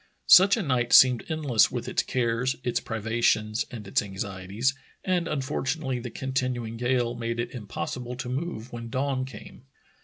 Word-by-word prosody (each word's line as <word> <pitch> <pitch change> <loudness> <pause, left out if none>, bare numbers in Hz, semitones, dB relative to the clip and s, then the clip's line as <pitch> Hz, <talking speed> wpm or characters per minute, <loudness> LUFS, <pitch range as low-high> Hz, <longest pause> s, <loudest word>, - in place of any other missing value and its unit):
Such 195 +4 +7
a 220 - -1
night 125 -5 0
seemed 125 -3 +7
endless 145 -8 +3
with - - -5
its - - +1
cares, 125 +1 0
its 120 - 0
privations, 110 0 0
and 110 -5 -8
its - - +2
anxieties, 100 +4 -2 0.3
and 180 -3 +1
unfortu 140 0 -2
nately 135 -5 -3
the 120 +1 -6
continuing 125 -2 -3
gale 120 0 0
made 115 0 -4
it 120 - -2
impossible 125 +2 -5
to 125 0 -6
move 125 -3 -4
when 115 -1 -6
dawn 130 +1 -1
came. 130 -1 -12
125 Hz, 160 wpm, -26 LUFS, 115-130 Hz, 0.3 s, Such